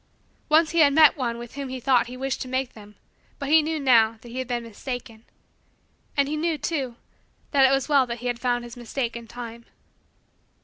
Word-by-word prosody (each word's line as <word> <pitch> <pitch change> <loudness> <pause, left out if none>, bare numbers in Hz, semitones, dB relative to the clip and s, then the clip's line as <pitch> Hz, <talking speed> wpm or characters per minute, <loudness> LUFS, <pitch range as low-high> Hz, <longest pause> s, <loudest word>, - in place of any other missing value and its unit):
Once 315 +1 +4
he 335 - +1
had 285 -3 +6
met 310 0 +7
one 240 -4 -2
with 240 0 -9
whom 275 -1 -5
he 260 0 -5
thought 250 -1 +2
he 250 +1 -8
wished 270 0 -3
to - - -4
make 260 0 -2
them 210 -1 -14 0.4
but 280 -1 -5
he 315 +1 +6
knew, 315 +1 -2
now, 230 -5 +4
that 240 - -12
he 250 +2 -5
had 260 - -3
been 240 -1 -2
mistaken. 230 0 -7 0.9
And 280 -1 +3
he 300 - -2
knew, 320 +1 -1
too, 270 -5 -3 0.6
that 270 -2 +5
it - - +1
was 270 0 +1
well 280 -4 +4
that 235 0 -4
he 245 - -10
had 245 -1 -1
found 245 -1 0
his 240 -1 -10
mistake 240 0 -4
in 235 -1 -8
time. 235 0 -8
255 Hz, 220 wpm, -25 LUFS, 235-280 Hz, 0.9 s, met